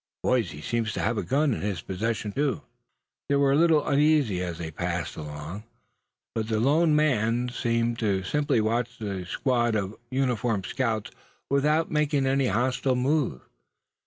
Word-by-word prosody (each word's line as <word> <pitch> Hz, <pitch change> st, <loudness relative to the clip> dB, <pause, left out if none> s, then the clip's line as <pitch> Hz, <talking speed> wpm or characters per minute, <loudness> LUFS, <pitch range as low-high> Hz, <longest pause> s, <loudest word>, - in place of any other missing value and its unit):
Boys, 125 Hz, -3 st, +2 dB
he 75 Hz, -, -9 dB
seems 110 Hz, +6 st, -1 dB
to -, -, -4 dB
have 115 Hz, +2 st, 0 dB
a -, -, 0 dB
gun 140 Hz, +1 st, +1 dB
in -, -, -4 dB
his 100 Hz, -5 st, -3 dB
possession, 105 Hz, +2 st, -2 dB
too." 145 Hz, +4 st, -1 dB, 0.7 s
They 140 Hz, -, +3 dB
were 140 Hz, -1 st, +3 dB
a -, -, +4 dB
little 160 Hz, -1 st, +4 dB
uneasy 140 Hz, -10 st, +3 dB
as 90 Hz, -2 st, -4 dB
they 80 Hz, -1 st, -5 dB
passed 85 Hz, +1 st, -3 dB
along; 75 Hz, +6 st, -7 dB, 0.7 s
but 110 Hz, -1 st, -2 dB
the 110 Hz, -1 st, 0 dB
lone 150 Hz, +6 st, +3 dB
man 125 Hz, -5 st, +2 dB
seemed 115 Hz, -1 st, -1 dB
to 100 Hz, -4 st, 0 dB
simply 145 Hz, +3 st, +1 dB
watch 120 Hz, +2 st, -1 dB
the 100 Hz, -5 st, -4 dB
squad 120 Hz, 0 st, +1 dB
of 100 Hz, 0 st, -2 dB
uniformed 125 Hz, -6 st, 0 dB
scouts 115 Hz, -5 st, -2 dB, 0.4 s
without 150 Hz, +3 st, +2 dB
making 150 Hz, -2 st, +1 dB
any 135 Hz, 0 st, +2 dB
hostile 130 Hz, +2 st, +1 dB
move. 130 Hz, -, 0 dB
120 Hz, 160 wpm, -26 LUFS, 105-140 Hz, 0.7 s, a